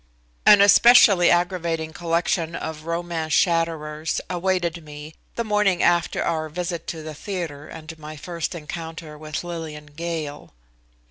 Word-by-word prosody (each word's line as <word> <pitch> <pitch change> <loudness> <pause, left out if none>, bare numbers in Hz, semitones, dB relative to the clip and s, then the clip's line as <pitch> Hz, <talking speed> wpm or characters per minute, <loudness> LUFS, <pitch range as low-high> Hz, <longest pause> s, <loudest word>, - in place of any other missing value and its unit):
An 205 -1 +9
especially 200 -3 +7
aggravating 170 -2 0
collection 170 0 -1
of 155 0 -6
romance 170 -2 -2
shatterers 160 -3 0
awaited 175 -2 -1
me 150 +1 -10 0.2
the 235 - -1
morning 210 -4 +2
after 175 -1 +2
our 155 -1 -1
visit 170 0 -4
to 160 -2 -5
the 155 0 -6
theatre, 160 -4 -5
and 160 0 -10
my 155 0 -8
first 170 +2 -4
encounter 160 -1 -7
with 155 +1 -5
Lillian 160 -3 -6
Gale. 160 - -5
165 Hz, 130 wpm, -23 LUFS, 155-175 Hz, 0.2 s, An